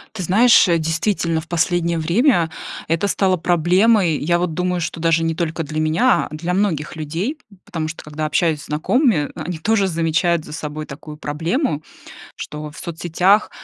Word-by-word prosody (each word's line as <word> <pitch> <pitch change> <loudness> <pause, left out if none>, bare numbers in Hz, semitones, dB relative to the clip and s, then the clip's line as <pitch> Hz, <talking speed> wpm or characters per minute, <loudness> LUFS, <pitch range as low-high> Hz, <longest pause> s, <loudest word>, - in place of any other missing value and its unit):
Ты 185 - -4
знаешь, 220 +5 +5
э, 170 -1 +3
действительно, 165 +1 0
в 160 - -14
последнее 170 0 0
время 170 - +2 0.4
это 165 +5 +1
стало 190 -2 +1
проблемой. 175 +1 +3
Я 170 +3 +1
вот 175 -2 -2
думаю, 180 +1 -1
что 165 0 -4
даже 165 0 +2
не 165 0 0
только 165 0 -2
для 155 +1 -4
меня, 160 +12 +2
а - - -8
для 170 +3 -3
многих 170 -7 -1
людей. 165 - -3 0.3
Потому 160 -2 -4
что, 160 - -7
когда 155 +1 -4
общаюсь 155 -1 +1
с - - -12
знакомыми, 155 - +1
они 165 0 -5
тоже 200 +2 +2
замечают 165 -1 +1
за - - -10
собой 155 -1 -5
такую 150 +2 -9
проблему, 160 - -2 0.5
что 150 0 -7
в 150 - -14
соцсетях 175 +5 +1
165 Hz, 170 wpm, -20 LUFS, 155-180 Hz, 0.5 s, знаешь